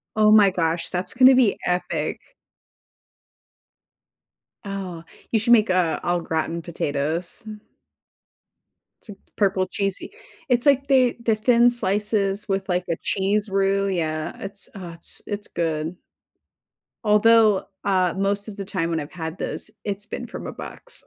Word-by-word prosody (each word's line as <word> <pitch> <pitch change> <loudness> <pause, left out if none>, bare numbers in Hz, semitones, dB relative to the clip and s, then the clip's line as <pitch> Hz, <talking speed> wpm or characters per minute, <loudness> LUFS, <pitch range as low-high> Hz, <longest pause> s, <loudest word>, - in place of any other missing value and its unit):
Oh 215 0 +5
my 210 -2 +7
gosh, 165 -2 -1
that's 180 0 -3
gonna 255 +1 +7
be 240 -6 +3
epic. 180 0 -1 2.5
Oh, 190 -4 -5 0.3
you 225 - +3
should 235 +3 +4
make, 215 -3 +5
uh, 180 -3 +1
au 175 0 +1
gratin 165 +1 -2
potatoes. 160 +2 -3 1.6
T 210 - -10 0.2
purple 190 -2 +1
cheesy. 195 0 -3 0.4
It's, 245 +1 +3
like, 275 -1 +4
they, 255 -3 +4
the 225 -2 +3
thin 235 +2 +4
slices 205 -2 0
with 195 0 -1
like 180 0 0
a 165 - 0
cheese 200 +2 0
roux, 195 0 +1
yeah, 155 -4 -2
it's, 200 0 -6
uh, 175 -4 -8 0.3
it's 205 0 -4
good. 160 0 -2 1.1
Although, 215 -1 +5 0.2
uh, 185 -3 +2
most 200 +1 0
of 200 - -10
the 200 - -5
time 180 -4 -2
when 165 -1 -1
I've 145 - -7
had 165 0 -6
this, - - -4
it's 205 0 -3
been 245 - -6
from 235 - -7
a - - -4
box. - - -9
195 Hz, 140 wpm, -23 LUFS, 175-215 Hz, 2.5 s, my